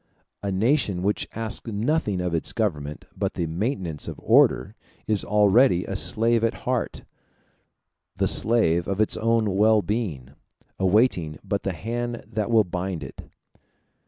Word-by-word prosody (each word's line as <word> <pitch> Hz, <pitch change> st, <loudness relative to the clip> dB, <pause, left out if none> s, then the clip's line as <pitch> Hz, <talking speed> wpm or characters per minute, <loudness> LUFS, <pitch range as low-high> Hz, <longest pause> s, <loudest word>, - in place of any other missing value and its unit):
A 100 Hz, -, -2 dB
nation 100 Hz, -2 st, +1 dB
which 105 Hz, +2 st, 0 dB
asks 115 Hz, +1 st, -3 dB
nothing 105 Hz, -, 0 dB
of 90 Hz, -1 st, -2 dB
its 80 Hz, -, -2 dB
government 75 Hz, -10 st, -2 dB
but -, -, -2 dB
the 85 Hz, -, -1 dB
maintenance 85 Hz, -, -3 dB
of -, -, -6 dB
order -, -, +4 dB, 0.3 s
is 105 Hz, -2 st, +1 dB
already 105 Hz, -1 st, +4 dB
a 100 Hz, -, -4 dB
slave 115 Hz, +3 st, +1 dB
at 115 Hz, -, +1 dB
heart 125 Hz, -1 st, -2 dB, 1.1 s
the -, -, +1 dB
slave 90 Hz, -7 st, +2 dB
of 100 Hz, 0 st, -2 dB
its 110 Hz, -, +1 dB
own 115 Hz, -3 st, +1 dB
well 110 Hz, +1 st, +4 dB
being, 85 Hz, -, -3 dB, 0.5 s
awaiting 95 Hz, -, +2 dB
but -, -, -2 dB
the -, -, -2 dB
hand 120 Hz, +2 st, -4 dB
that 110 Hz, 0 st, -3 dB
will 115 Hz, -2 st, +5 dB
bind 90 Hz, -2 st, -4 dB
it. 65 Hz, -, -10 dB
105 Hz, 145 wpm, -24 LUFS, 90-115 Hz, 1.1 s, will